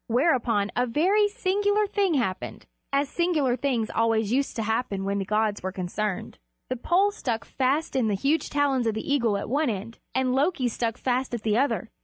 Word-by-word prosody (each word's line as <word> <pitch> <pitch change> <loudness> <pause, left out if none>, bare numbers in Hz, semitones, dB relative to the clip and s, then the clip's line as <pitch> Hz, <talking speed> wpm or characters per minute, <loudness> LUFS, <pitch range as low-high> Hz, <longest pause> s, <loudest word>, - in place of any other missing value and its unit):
Whereupon 235 -5 +2
a 250 +1 +1
very 380 - +3
singular 410 -1 +1
thing 395 -4 +1
happened, 210 -9 -2 0.3
as 280 +1 +1
singular 305 -6 +1
things 245 -4 -1
always 225 -2 +1
used 275 +3 0
to 225 - -1
happen 220 -3 -1
when 200 0 -1
the 195 - -2
gods 215 +1 0
were 190 - -3
concerned: 190 - -4 0.3
the 255 - -1
pole 365 +11 +2
stuck 235 - -3
fast 275 +4 0
in 250 -4 +2
the 205 - +1
huge 285 +9 0
talons 275 -4 +1
of 220 - 0
the 220 +6 -2
eagle 235 -7 +2
at 200 - -5
one 285 +3 +1
end, 220 +2 -5 0.2
and 260 -1 +1
Loki 275 -1 +1
stuck 230 0 -2
fast 255 0 -1
at 230 - -6
the 215 -1 +1
other 240 -2 +2
end. - - -15
250 Hz, 200 wpm, -26 LUFS, 220-290 Hz, 0.3 s, very